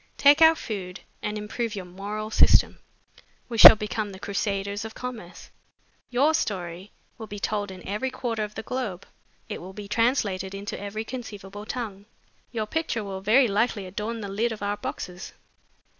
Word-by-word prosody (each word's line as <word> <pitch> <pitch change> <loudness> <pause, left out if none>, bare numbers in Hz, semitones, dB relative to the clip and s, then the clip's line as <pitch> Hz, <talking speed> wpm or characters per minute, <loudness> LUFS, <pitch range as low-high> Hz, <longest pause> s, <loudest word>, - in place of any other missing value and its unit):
'Take 285 +2 +6
our 320 0 +8
food 195 - -6 0.2
and 210 0 -3
improve 215 +1 -3
your 190 -2 -5
moral 205 +4 -5
system.' - - +5 0.7
We 230 -2 -3
shall - - +13
become 210 0 -3
the 190 -1 -10
crusaders 200 0 -2
of 220 0 -8
commerce. 235 -8 -8 0.6
Your 275 +6 +3
story 185 - -3 0.3
will 220 - -7
be 205 - -7
told 205 0 -2
in 185 -1 -10
every 210 +7 -1
quarter 240 -4 -2
of 210 0 -6
the - - -5
globe, 210 -8 -4 0.4
it - - -6
will 185 +2 -9
be 205 0 -8
translated 205 -4 +1
into 200 +1 -5
every 205 +2 -4
conceivable 205 -4 -8
tongue. 210 -5 -5 0.4
Your 220 -2 -2
picture 235 -3 -2
will 195 -1 -5
very 235 +6 +5
likely 210 -1 0
adorn 210 +5 -4
the 200 - -4
lid 215 +4 0
of 215 -2 -6
our 205 0 -1
boxes. 180 -1 -6
210 Hz, 170 wpm, -26 LUFS, 195-230 Hz, 0.7 s, shall